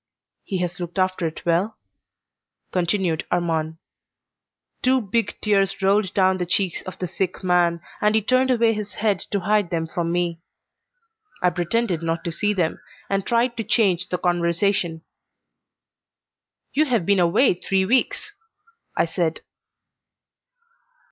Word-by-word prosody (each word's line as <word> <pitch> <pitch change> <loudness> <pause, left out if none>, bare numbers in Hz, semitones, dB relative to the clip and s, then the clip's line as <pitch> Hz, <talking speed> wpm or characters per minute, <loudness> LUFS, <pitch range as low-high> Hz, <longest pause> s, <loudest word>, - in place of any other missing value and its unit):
"He 190 - -3
has 175 +1 -8
looked 175 +1 -6
after 185 -2 +1
it 160 - -8
well?" 175 +6 +1 0.9
continued 180 -2 0
Armand. 160 -2 -1 1.0
Two 260 +1 +3
big 225 +1 -1
tears 195 -3 +2
rolled 195 0 +3
down 190 -1 +3
the 180 - -1
cheeks 185 -1 0
of 185 0 -7
the 180 - -3
sick 185 +2 -3
man, 175 -2 +2 0.2
and 210 +1 +3
he 220 - +4
turned 255 +3 +2
away 230 -2 +3
his 210 -2 -6
head 205 -3 +1
to 200 - -1
hide 205 -1 +1
them 165 -1 -1
from 170 +1 -2
me. 175 -1 -1 1.0
I 180 - +4
pretended 180 0 0
not 165 0 -2
to 170 - -3
see 205 +5 0
them, 180 -6 -1 0.3
and 195 -1 0
tried 235 +1 +2
to 225 - -1
change 190 -5 +2
the 180 - -1
conversation. 175 -1 0 1.7
"You 305 +2 +3
have 235 - 0
been 200 0 +3
away 175 +9 +4
three 190 +1 0
weeks," 255 - +1 0.6
I - - +3
said. 165 -1 -2
185 Hz, 140 wpm, -23 LUFS, 170-210 Hz, 1.7 s, he